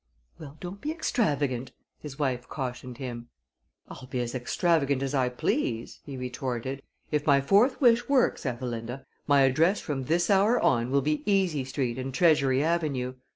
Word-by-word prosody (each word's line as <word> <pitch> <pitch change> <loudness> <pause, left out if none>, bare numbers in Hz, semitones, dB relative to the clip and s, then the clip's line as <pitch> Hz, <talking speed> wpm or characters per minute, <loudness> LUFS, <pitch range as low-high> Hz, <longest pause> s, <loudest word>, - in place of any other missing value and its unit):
"Well, 150 -1 -10
don't 185 +3 -8
be 295 - -3
extravagant," 145 - -1 0.3
his 145 -3 -9
wife 130 -4 -2
cautioned 125 -2 -5
him. 120 -3 -7 0.6
"I'll 130 - -10
be 125 -1 -3
as 120 -1 -4
extravagant 140 +1 +1
as 135 +1 -3
I 130 -3 +2
please," 120 -1 -2
he 140 -3 -8
retorted. 125 +1 -4 0.3
"If 150 -1 -1
my 140 -1 +6
fourth 205 - +3
wish 240 -2 +4
works, 270 -3 +2
Ethelinda, 120 0 -4 0.2
my 140 -1 +5
address 160 +9 +3
from 135 -4 -4
this 170 +6 +1
hour 205 +5 +4
on 120 -2 +2
will 140 0 +2
be 150 +1 0
Easy 180 -8 +1
Street 130 -2 -2
and 130 +1 -4
Treasury 140 -3 +3
Avenue. 150 -7 -1
135 Hz, 160 wpm, -27 LUFS, 125-165 Hz, 0.6 s, my